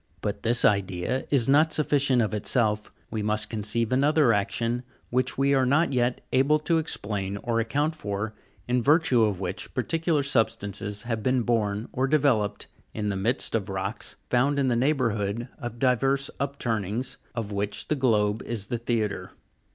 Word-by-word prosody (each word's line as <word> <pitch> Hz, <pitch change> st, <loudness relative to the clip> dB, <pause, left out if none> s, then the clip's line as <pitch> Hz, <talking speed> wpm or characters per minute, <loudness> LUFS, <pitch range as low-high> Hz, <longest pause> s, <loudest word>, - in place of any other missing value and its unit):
But -, -, -3 dB
this 120 Hz, +1 st, +3 dB
idea 100 Hz, +5 st, 0 dB
is 130 Hz, -5 st, +2 dB
not 150 Hz, +4 st, +4 dB
sufficient 140 Hz, -5 st, +3 dB
of 110 Hz, -, -2 dB
itself; 105 Hz, 0 st, 0 dB, 0.2 s
we 110 Hz, -, -2 dB
must 105 Hz, +1 st, -1 dB
conceive 110 Hz, +1 st, -1 dB
another 140 Hz, -1 st, +4 dB
action, 115 Hz, +4 st, 0 dB, 0.3 s
which 125 Hz, +1 st, 0 dB
we 140 Hz, +1 st, +3 dB
are 135 Hz, -1 st, +3 dB
not 145 Hz, +4 st, +2 dB
yet 125 Hz, 0 st, +1 dB
able 135 Hz, +4 st, +4 dB
to 165 Hz, +1 st, +2 dB
explain 100 Hz, -9 st, -3 dB
or 115 Hz, -1 st, 0 dB
account 145 Hz, +7 st, 0 dB
for, 105 Hz, -4 st, -4 dB, 0.3 s
in 125 Hz, 0 st, +1 dB
virtue 145 Hz, -2 st, +4 dB
of 105 Hz, -4 st, +1 dB
which 95 Hz, -1 st, -4 dB
par 125 Hz, -, +1 dB
ticular 165 Hz, 0 st, 0 dB
substances 105 Hz, -5 st, -1 dB
have 115 Hz, -2 st, -2 dB
been 130 Hz, +2 st, +1 dB
borne, 110 Hz, -2 st, 0 dB
or 130 Hz, +1 st, +1 dB
developed, 130 Hz, -9 st, +1 dB, 0.3 s
in 105 Hz, -1 st, -1 dB
the 100 Hz, -, -1 dB
midst 115 Hz, +7 st, -1 dB
of 105 Hz, -3 st, -1 dB
rocks 95 Hz, -1 st, -4 dB
found 140 Hz, +4 st, +2 dB
in 135 Hz, -2 st, +2 dB
the 120 Hz, -, +2 dB
neighbourhood 120 Hz, -4 st, 0 dB
of 120 Hz, -1 st, -6 dB
divers 135 Hz, +2 st, +1 dB
upturnings, 120 Hz, -4 st, -2 dB, 0.2 s
of 110 Hz, -3 st, -3 dB
which 100 Hz, 0 st, -3 dB
the 155 Hz, -, +1 dB
globe 110 Hz, -5 st, +1 dB
is 110 Hz, -4 st, -4 dB
the 120 Hz, +2 st, -3 dB
theatre. 110 Hz, -4 st, -2 dB
120 Hz, 165 wpm, -26 LUFS, 105-135 Hz, 0.3 s, not